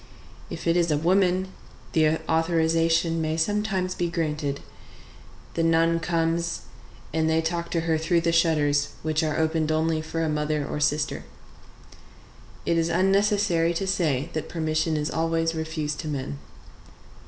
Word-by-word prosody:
If - - -7
it 170 - +3
is 170 -1 +2
a 150 - +2
woman, 185 +3 +2 0.4
the 160 -1 +4 0.2
authorization 165 0 +2
may 155 0 -1
sometimes 190 +1 0
be 175 -1 -2
granted; 150 -4 -2 0.9
the 165 - -1
nun 165 0 +3
comes, 165 0 -1 0.5
and 160 0 +1
they 160 0 +3
talk 170 +1 -2
to 165 - 0
her 160 -1 0
through 165 +2 +2
the 170 0 +1
shutters, 150 -4 +2
which 155 +1 0
are 155 -1 -1
opened 160 -1 +1
only 160 0 +1
for 165 +1 -3
a - - 0
mother 150 -1 -1
or - - -3
sister. 150 - 0 1.4
It 170 - +2
is 165 0 0
unnecessary 195 -1 +2
to 195 - -1
say 160 -8 0
that 155 - -4
permission 155 -1 0
is 150 0 -2
always 165 0 0
refused 160 -2 -3
to - - -5
men. 130 - -4
165 Hz, 150 wpm, -25 LUFS, 155-170 Hz, 1.4 s, the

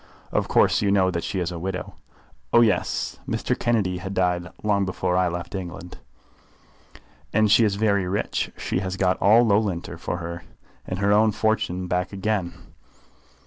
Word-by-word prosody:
"Of - - 0
course - - +3
you 100 - +1
know 95 -2 +3
that 85 -1 -3
she 95 - -3
is 90 -1 -2
a 85 - -5
widow." 90 +1 -4 0.6
"Oh, 120 - +6
yes; 105 -6 0
Mr. - - -1
Kennedy 100 -7 0
had 95 +1 -6
died 90 -1 0
long 100 -2 +2
before 90 -1 -1
I 90 0 +3
left 85 +1 -5
England." 90 -2 -7 1.3
"And 110 0 +3
she 115 - +6
is 105 -3 +2
very 100 -3 +1
rich. 100 +3 -2
She - - -2
has 95 0 -4
got 95 -1 +1
all 110 +5 +6
Loughlinter 100 -5 0
for - - -3
her 85 -1 -5
life, 85 - -15 0.4
and 95 - -3
her 100 +1 +1
own 110 +1 +4
fortune 110 -4 0
back 90 +1 -1
again. 100 -3 -2
95 Hz, 175 wpm, -24 LUFS, 90-105 Hz, 1.3 s, Oh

